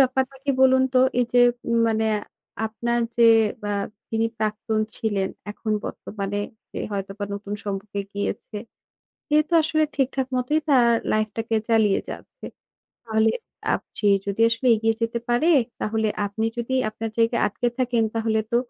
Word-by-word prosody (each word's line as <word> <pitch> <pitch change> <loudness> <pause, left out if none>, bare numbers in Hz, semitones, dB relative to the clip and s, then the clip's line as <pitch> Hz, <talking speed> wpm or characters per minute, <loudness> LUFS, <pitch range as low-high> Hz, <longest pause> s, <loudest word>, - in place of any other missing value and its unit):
ব্যাপারটা 265 0 +2
কি 285 - +1
বলুন 260 0 +6
তো? 255 - +6 0.2
এই 245 - +4
যে 245 - +5 0.3
উম 235 0 +2
মানে 220 0 +1 0.6
আপনার 235 +2 -1 0.2
যে 235 -1 +6 0.4
আ - - 0 0.4
যিনি 225 0 +1
প্রাক্তন 215 0 -1 0.2
ছিলেন, 200 -4 -1 0.2
এখন 215 +1 -3
বর্তমানে 205 -1 -4 0.3
যে - - -5
হয়তোবা 195 +1 -4
নতুন 205 0 -5
সম্পর্কে 200 0 -4
গিয়েছে। 205 +1 -4 0.7
সে 300 -1 +3
তো - - -3
আসলে 310 0 +2
ঠিকঠাক 265 -1 0
মতোই 255 +5 +1
তার 250 -4 +5 0.2
লাইফ 215 0 +2
টাকে 225 0 -1
চালিয়ে 220 -3 +4
যাচ্ছে, - - -9 0.6
তাহলে 220 -1 +2 0.4
আপ - - -3 0.2
যে 210 - +2 0.2
যদি 200 +2 -3
আসলে 230 +3 -1
এগিয়ে 225 +1 +1
যেতে 230 +1 0
পারে, 240 +8 +3 0.3
তাহলে 220 0 0 0.2
আপনি 220 +3 -2
যদি 240 +2 -2
আপনার 220 +1 -5
জায়গায় 230 +1 +2
আটকে 240 +4 -1
থাকেন 245 -2 +1
তাহলে 220 -1 +1
তো, - - +4
225 Hz, 155 wpm, -24 LUFS, 215-245 Hz, 0.7 s, বলুন